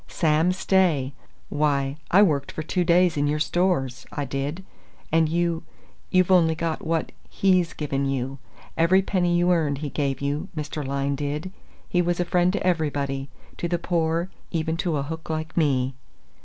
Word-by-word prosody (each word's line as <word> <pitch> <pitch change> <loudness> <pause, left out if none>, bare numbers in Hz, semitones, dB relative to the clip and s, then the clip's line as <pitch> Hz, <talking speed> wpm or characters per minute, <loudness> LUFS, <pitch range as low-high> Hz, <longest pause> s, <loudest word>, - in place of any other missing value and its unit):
Sam 160 +1 +2
Stay 180 -8 +2 0.4
why, 145 -2 0
I 200 +4 +6
worked 145 -7 +1
for 155 - -5
two 180 +3 0
days 175 -1 +3
in 145 0 +2
your 150 +1 +1
Stores, 155 -5 0
I 145 - -3
did. 140 +7 -4 0.5
And 160 -1 +3
you 170 0 0 0.5
you've 185 0 +3
only 165 -3 +5
got 165 0 -2
what 165 0 -1 0.2
he's 185 -3 +2
given 140 -2 -2
you. 135 0 -2 0.4
Every 180 +4 +4
penny 175 -3 +1
you 175 +1 +3
earned 155 -5 +1
he 145 0 -5
gave 140 -3 -1
you, 145 +6 -2
did 155 - -2
Mr. 150 0 -5
Lyne. 140 +4 -2 0.4
He 175 - +2
was 175 0 0
a 175 - +1
friend 180 +1 +2
to 205 - -2
everybody 140 -5 -1 0.3
to 170 - -2
the 175 0 0
poor, 170 +1 0 0.2
even 160 -1 -1
to 170 -4 0
a 140 - -1
hook 160 +3 -7
like 155 0 -3
me." 135 -5 +2
160 Hz, 170 wpm, -24 LUFS, 140-175 Hz, 0.5 s, I